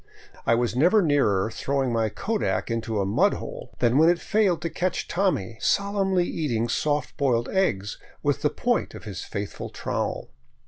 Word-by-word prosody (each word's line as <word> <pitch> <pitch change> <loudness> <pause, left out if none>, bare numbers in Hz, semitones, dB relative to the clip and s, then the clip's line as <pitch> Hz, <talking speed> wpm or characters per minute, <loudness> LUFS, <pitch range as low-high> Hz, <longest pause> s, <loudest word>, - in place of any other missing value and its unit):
I 115 - +5
was 120 0 0
never 180 - +4
nearer 115 - +2
throwing 135 -1 -1
my 115 -1 +1
kodak 210 - -2
into 115 -2 -2
a 100 - +1
mud 100 - +3
hole - - -7
than 120 +3 +3
when 160 +2 +6
it 175 0 +2
failed 200 -5 +2
to 165 - -1
catch 185 0 -2
Tommy 115 - -1
solemnly 195 -3 +1
eating 120 -10 -1
soft 145 +2 -1
boiled 120 -4 +1
eggs 105 - 0 0.2
with - - +1
the - - +3
point - - -1
of - - -10
his 100 -4 -6
faithful 100 0 -5
trowel. - - -3
135 Hz, 170 wpm, -25 LUFS, 115-180 Hz, 0.2 s, when